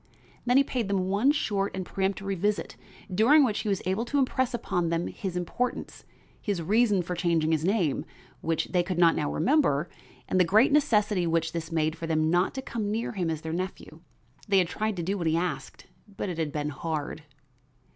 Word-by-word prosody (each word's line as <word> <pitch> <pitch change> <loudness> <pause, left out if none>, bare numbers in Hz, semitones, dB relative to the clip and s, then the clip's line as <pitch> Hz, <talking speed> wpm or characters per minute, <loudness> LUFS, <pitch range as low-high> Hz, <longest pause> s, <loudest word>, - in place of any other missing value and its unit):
Then 245 +2 +5
he 275 - +6
paid 245 -5 -2
them 190 -2 0
one 210 +8 +3
short 205 -10 -1
and 185 - -3
peremptory 195 +1 -2
visit, 205 +3 -1 0.4
during 260 +10 +6
which 215 -4 -1
he 215 - -2
was 195 -2 -1
able 190 +5 0
to 285 - -1
impress 260 -1 +1
upon 180 -8 -1
them 170 +1 0
his 185 -3 -5
importance, 240 +8 -3 0.4
his 200 -4 -2
reasons 205 +1 +2
for 180 - -3
changing 170 -3 +1
his 160 -1 +1
name, 180 -6 +1 0.4
which 165 -1 -1
they 180 - +2
could 175 0 -3
not 170 -2 +5
now 150 - -1
remember, 175 - +2 0.4
and 185 - +1
the - - +7
great 215 +10 +4
necessity 210 - +2
which 165 -1 0
this 165 0 -5
made 160 -1 0
for 165 0 -6
them 155 0 +1
not 175 +7 +2
to 265 - -4
come 225 -5 -3
near 225 +3 -2
him 180 -6 -2
as 160 -1 -3
their 160 0 -4
nephew. 185 +2 -5 0.5
They 200 -1 +3
had 180 -2 +4
tried 215 +2 -2
to 175 - -3
do 195 +4 -2
what 170 - -1
he 160 +1 +2
asked, 170 -6 -4 0.3
but - - -2
it 170 -2 -4
had 155 -2 -1
been 150 0 -2
hard. 150 +1 -4
185 Hz, 205 wpm, -27 LUFS, 165-210 Hz, 0.5 s, the